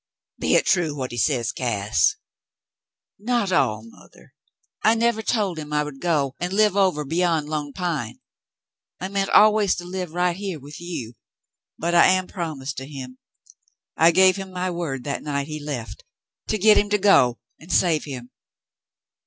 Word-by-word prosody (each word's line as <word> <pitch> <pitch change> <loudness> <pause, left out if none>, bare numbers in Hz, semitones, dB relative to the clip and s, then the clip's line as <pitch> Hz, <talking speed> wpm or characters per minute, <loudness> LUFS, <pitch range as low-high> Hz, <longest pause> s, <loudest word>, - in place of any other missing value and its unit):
"Be - - +1
hit - - +4
true, 165 -6 +1
what 130 -3 -4
he 120 - -6
says, 120 -2 +1
Cass.^" 105 -5 0 1.0
"Not 230 -2 0
all, 110 - +1
mother. 115 - -18 0.5
I 220 +1 +4
never 230 -1 +1
told 205 -7 -1
him 150 -1 -8
I 150 0 +1
would 150 -2 -9
go 150 -6 0
and 175 +1 -3
live 210 -1 +3
over 185 -7 +2
beyond 165 0 0
Lone 150 -2 -3
Pine. 150 - -4 0.8
I 185 - -4
meant 195 0 -1
always 210 -2 +5
to 175 - -7
live 180 -1 -5
right 180 -1 +1
here 190 -4 -5
with 145 +4 -11
you, 165 -10 -6 0.6
but 170 +2 -2
I 170 - +7
am 185 0 +2
promised 155 -8 -5
to 135 +1 -6
him. 130 -3 -9 0.8
I 165 - +5
gave 185 +2 +5
him 195 -1 -7
my 185 0 -2
word 155 -7 -4
that 140 +1 -3
night 140 -2 -2
he 155 +1 -6
left, 135 -6 -6 0.4
to 215 - 0
get 215 +2 +5
him 205 - -1
to 210 - +2
go 155 - +4 0.2
and 165 +3 -11
save 165 -3 +2
him. 125 -4 -8
170 Hz, 170 wpm, -23 LUFS, 140-190 Hz, 1.0 s, I